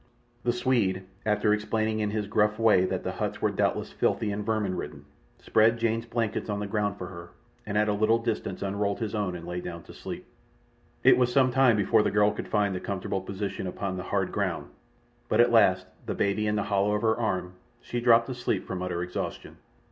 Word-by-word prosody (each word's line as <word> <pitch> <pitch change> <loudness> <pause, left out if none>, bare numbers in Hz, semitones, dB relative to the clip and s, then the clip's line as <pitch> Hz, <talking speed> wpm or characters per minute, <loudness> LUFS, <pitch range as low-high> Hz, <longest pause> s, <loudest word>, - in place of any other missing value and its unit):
The 120 - +2
Swede, 115 -7 +1 0.2
after 105 0 +3
explaining 110 +1 0
in 105 -1 0
his 105 0 -2
gruff 105 +1 +1
way 105 -5 +4
that - - -2
the - - -2
huts - - -3
were - - +1
doubtless - - 0
filthy 105 - 0
and 105 +1 -3
vermin 105 -3 0
ridden, 75 -4 -7 0.3
spread 115 +1 +3
Jane's 115 0 -1
blankets 115 -2 -2
on 105 0 -1
the 105 - -3
ground 100 0 -1
for 90 - -5
her, 85 -2 -9 0.4
and 105 0 -1
at 105 0 +3
a 105 - +2
little 110 +2 +3
distance 115 -3 -3
unrolled 100 0 -1
his 110 -2 -3
own 100 -4 -1
and 85 -1 -8
lay 90 0 -4
down 85 -1 -7
to - - -13
sleep. - - -7 0.8
It - - +6
was 125 -1 +3
some 130 0 +4
time 130 -2 +5
before 105 +2 +4
the - - +1
girl 105 0 +3
could - - -6
find 100 -2 +1
a - - -2
comfortable 95 0 -3
position 95 0 -4
upon 95 +1 -3
the 90 - -4
hard - - 0
ground, - - -2 0.6
but - - +2
at 120 0 +6
last, 95 -5 +4 0.2
the - - -2
baby 105 +2 0
in 105 - +1
the 105 - 0
hollow 100 +1 +1
of 105 - -2
her 110 0 +3
arm, 90 -5 -1 0.3
she 120 - -4
dropped 115 -1 +5
asleep 125 -6 -2
from 95 -1 -4
utter 90 -1 -2
exhaustion. 90 0 -5
105 Hz, 215 wpm, -27 LUFS, 95-115 Hz, 0.8 s, It